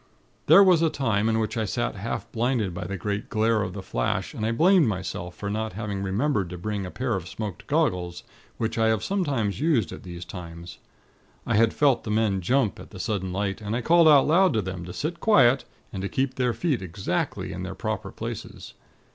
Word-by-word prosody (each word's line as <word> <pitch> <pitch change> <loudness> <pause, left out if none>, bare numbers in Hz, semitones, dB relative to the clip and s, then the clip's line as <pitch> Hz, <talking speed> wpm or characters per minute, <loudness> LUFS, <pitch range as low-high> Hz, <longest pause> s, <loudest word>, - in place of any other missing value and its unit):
"There 200 - +9
was 180 -4 +5
a 165 - +3
time 110 -7 0
in 110 - +1
which 110 -1 -1
I 110 - 0
sat 120 +4 -1
half 105 +3 -4
blinded 115 -5 0
by 90 - -5
the 100 +2 -4
great 100 +4 -3
glare 110 0 +2
of - - -3
the - - -7
flash, - - -2
and - - -5
I 110 - +1
blamed 170 +4 +4
myself 90 -3 -4
for 100 - -6
not 110 +1 -2
having 100 -1 -4
remembered 100 - 0
to 90 - -6
bring 100 +1 -3
a - - -6
pair 125 +4 -2
of 90 -3 -3
smoked 105 -2 -6
goggles, 90 -1 0 0.3
which 110 0 -2
I 110 - +4
have 110 -1 +1
sometimes 140 - -1
used 140 - +1
at - - -8
these 85 -2 -8
times. 85 -1 -9 0.7
I 115 - 0
had 115 +1 +4
felt 140 -4 +2
the - - -6
men 105 -3 +1
jump, 125 +3 +1
at - - -11
the 95 - -11
sudden 95 -4 -2
light, 100 +2 -2
and 105 +1 -3
I 125 - -1
called 170 +4 +5
out 145 -3 +7
loud 175 +2 +4
to 110 - +1
them 90 -1 -5
to 90 - -7
sit 170 +3 -3
quiet, 135 - +4 0.3
and 95 - -4
to 100 - -3
keep 135 0 0
their 125 -2 0
feet 150 - 0
exactly 95 +1 -3
to - - -6
their - - -5
proper - - -4
places. - - -7
110 Hz, 220 wpm, -25 LUFS, 95-130 Hz, 0.7 s, There